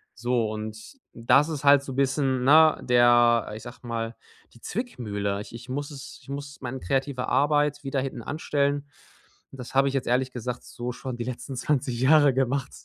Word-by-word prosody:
So 120 -1 0
und 110 - -7 0.2
das 135 +6 +3
ist 150 -3 -4
halt 140 -1 +6
so 135 -2 -7
bisschen, 135 -1 +1
ne, 155 +3 +6
der, 120 -2 +4
ich 110 - -9
sag 120 0 -11
mal: 115 -1 -4 0.4
„Die 120 - -18
Zwickmühle“. 105 - -3
Ich 105 - -11
ich 120 +2 -11
muss 145 +2 -3
es 140 -2 -10
ich - - -19
muss 140 0 -7
mein 130 +1 -5
kreative 135 -1 -1
Arbeit 145 0 +2
wieder 135 -1 -1
hintanstellen. 140 +2 -2 0.6
Und 135 - -13
das 125 - -8
habe 135 +1 +4
ich 135 - -1
jetzt 135 - -1
ehrlich 130 +1 +1
gesagt 125 0 -5
so 120 +1 -5
schon 130 +1 -6
die 120 - -3
letzten 130 +2 -6
20 125 -2 -1
Jahre 145 +1 +5
gemacht, 135 +1 -1
130 Hz, 180 wpm, -26 LUFS, 120-140 Hz, 0.6 s, halt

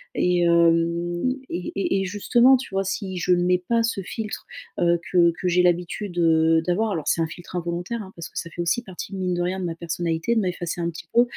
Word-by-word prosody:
Et, 180 -1 +2
hem, 170 +5 +2 0.2
et 175 +1 -4
et 195 0 0
et - - -1
justement, 235 +7 +4
tu 260 +1 -4
vois, 195 0 0
si 190 -1 -3
je 180 +1 +2
ne 175 0 +2
mets 180 0 +2
pas 230 -1 +2
ce 225 -3 -1
filtre, 215 +3 -6 0.3
heu, 170 0 +3
que 175 -2 +5
que 185 - +1
j'ai 180 +1 +4
l'habitude 180 +2 0
de 165 -1 +3
d'avoir- 210 +5 +1
alors, 160 -6 -3
c'est 165 - +2
un 165 - +1
filtre 175 +3 -10
involontaire, 175 +6 -3
hein, 190 -1 -10
parce 170 -1 -7
que - - -12
ça 170 - -6
fait 175 - -5
aussi 170 +7 +1
partie, 190 -1 -8
mine 185 -2 -1
de 175 - -1
rien, 180 +2 -1
de 185 - -3
ma 165 -1 -3
personnalité 170 0 -10 0.5
de - - +3
m'effacer 175 -2 -3
un 170 - 0
petit 165 0 -10
peu- 235 - +8
175 Hz, 240 wpm, -24 LUFS, 170-195 Hz, 0.5 s, peu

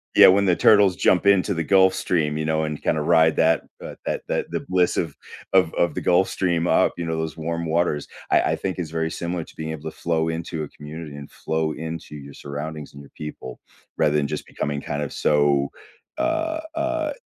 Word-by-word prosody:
Yeah, - - +9
when 100 +2 +5
the 90 -2 +3
turtles 100 -4 +5
jump 90 - +3
into 100 0 +4
the 85 -2 -2
Gulf 95 +1 +5
Stream, 80 -5 0
you 80 - -2
know, 80 0 +1
and 75 -1 -5
kinda 75 - +1
ride 80 +1 +4
that, 80 0 +3 0.2
uh, - - -7
that - - -2
that - - -2
the - - -1
bliss 90 -1 +2
of 85 - -2 0.4
of 90 -4 +4
of 85 -3 +1
the - - -2
Gulf 90 +2 +3
Stream 85 -2 0
up, - - +3
you 85 - -3
know, 80 0 -2
those 80 -1 -4
warm 85 +1 -3
waters, 80 -2 0 0.2
I - - +5
I - - +1
think 95 - -3
is 85 -4 -4
very 80 0 -1
similar 85 -1 -3
to - - -17
being 80 0 -5
able 80 0 -5
to - - -16
flow 80 -1 +1
into 80 -1 -4
a 75 - -7
community, 75 0 -8
and 70 -1 -10
flow 80 0 -2 0.2
into 80 -2 -7
your 70 0 -11
surroundings 75 +1 -6
and 70 - -11
your 70 - -15
people 65 -4 -8 0.4
rather 75 -1 +2
than 70 - +1
just - - -4
becoming 70 -1 -3
kind 75 0 -3
of 70 - -5
so, 70 -2 +2 0.5
uh, 320 0 0 0.2
uh, 320 -1 -1
80 Hz, 220 wpm, -23 LUFS, 75-90 Hz, 0.5 s, Yeah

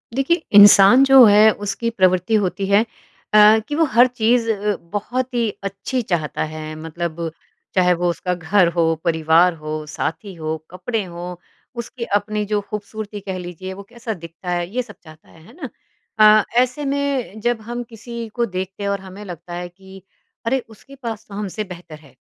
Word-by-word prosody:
देखिए 315 +5 +1 0.2
इंसान 205 +5 +8
जो 270 -1 +8
है 210 +1 +7
उसकी 205 +3 -3
प्रवृत्ति 185 -1 +2
होती 195 +2 -3
है 200 +2 +4 0.5
अ, 215 +1 +7
कि 295 - -3
वो 325 +1 +3
हर 240 +3 +6
चीज़ 235 -1 +1
अ, 205 -1 -1
बहुत 240 +8 -4
ही 235 -2 +1
अच्छी 200 +6 -3
चाहता 170 -9 -2
है। 155 0 -7
मतलब 165 +1 -5 0.4
चाहे 180 -1 +4
वो 175 0 0
उसका 180 +1 -2
घर 180 +2 +2
हो, 165 -1 +2
परिवार 165 +1 +3
हो, 155 -1 -6
साथी 190 +6 -4
हो, 160 -1 -3
कपड़े 200 +5 -3
हो, 175 0 -8 0.4
उसकी 235 +1 -6
अपनी 210 +1 -1
जो 210 0 0
खूबसूरती 210 0 -6
कह 190 -2 -5
लीजिए 180 +1 -7
वो 200 +1 -10
कैसा 235 -1 -5
दिखता 170 0 -10
है 175 -1 -1
ये 250 - +1
सब 210 -3 -14
चाहता 155 -2 -16
है। 160 - -18
है - - -16
ना? 270 - -5 0.5
अ, 215 0 +7 0.2
ऐसे 255 +4 -2
में 275 -6 -2
जब 240 0 0
हम 240 +2 -5
किसी 235 0 -8
को 240 -1 +1
देखते 190 0 -5
हैं 200 - -1
और 200 0 -1
हमें 190 +2 -10
लगता 175 -1 -9
है 175 0 -5
कि 190 +2 -15 0.4
अरे, 265 +4 +1
उसके 225 +5 -15
पास 225 -2 -5
तो 200 - -10
हमसे 210 +1 -4
बेहतर 175 -5 -11
है। 140 -4 -20
200 Hz, 185 wpm, -20 LUFS, 175-230 Hz, 0.5 s, इंसान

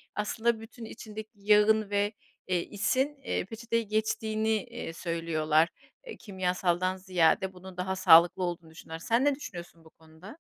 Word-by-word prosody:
aslında 220 +2 0
bütün 225 +1 -10
içindeki 215 -1 -9
yağın 210 +1 +3
ve, 205 +1 0 0.3
eee, 180 -1 +1
isin, 260 +8 0
eee, - - -2
peçeteye 230 +2 -2
geçtiğini, 220 +1 -1
eee, 240 -8 -7
söylüyorlar. 165 -2 +1 0.5
Kimyasaldan 185 -2 -1
ziyade 185 0 +2
bunun 185 0 -12
daha 190 +1 -2
sağlıklı 175 0 +6
olduğunu 170 -2 -4
düşünüyorlar. 160 0 -9
Sen 235 +4 +3
ne 285 -1 +3
düşünüyorsun 175 - -9
bu - - -15
konuda? 160 - -15
190 Hz, 135 wpm, -29 LUFS, 175-220 Hz, 0.5 s, sağlıklı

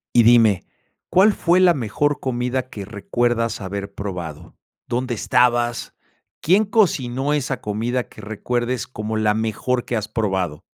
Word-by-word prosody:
Y 120 - +8
dime, 115 -4 +5 0.4
¿cuál 200 +3 +5
fue 175 0 +2
la 185 -2 +6
mejor 145 +3 -1
comida 125 0 -2
que 100 -2 -7
recuerdas 115 +3 -1
haber 100 +1 -5
probado? 85 -5 -6 0.3
¿Dónde 125 0 -2
estabas? 120 0 +1 0.4
¿Quién 190 +7 +3
cocinó 145 - +1
esa 135 -4 -2
comida 115 +4 -1
que - - -13
recuerdes 120 +3 -2
como 110 -2 -4
la 105 -1 +2
mejor 115 +3 -1
que 120 - -2
has 110 -1 -2
probado? 95 -8 -2
120 Hz, 140 wpm, -21 LUFS, 105-130 Hz, 0.4 s, Y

